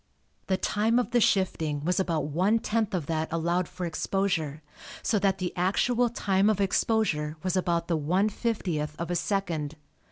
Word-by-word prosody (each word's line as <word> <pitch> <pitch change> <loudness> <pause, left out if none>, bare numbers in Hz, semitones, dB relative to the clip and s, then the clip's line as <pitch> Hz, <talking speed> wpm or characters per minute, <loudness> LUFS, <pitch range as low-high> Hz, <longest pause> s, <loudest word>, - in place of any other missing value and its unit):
The 190 - +1
time 215 +5 +1
of 245 -1 0
the 240 -1 +3
shifting 160 -8 +1
was 180 +3 +1
about 165 -5 0
one 185 +9 +2
tenth 220 -2 -1
of 170 -5 -2
that 160 0 -2
allowed 170 +2 0
for 180 0 -5
exposure, 165 -3 -1 0.4
so 215 - +2
that 195 -1 +2
the 185 -2 -3
actual 235 +7 +2
time 200 -3 +2
of 210 -2 +1
exposure 190 -6 +1
was 185 -1 0
about 170 -2 0
the 170 - +1
one 180 +7 +2
fiftieth 180 -10 -2
of 170 +1 -3
a - - 0
second. 170 -5 -1
185 Hz, 170 wpm, -27 LUFS, 160-205 Hz, 0.4 s, the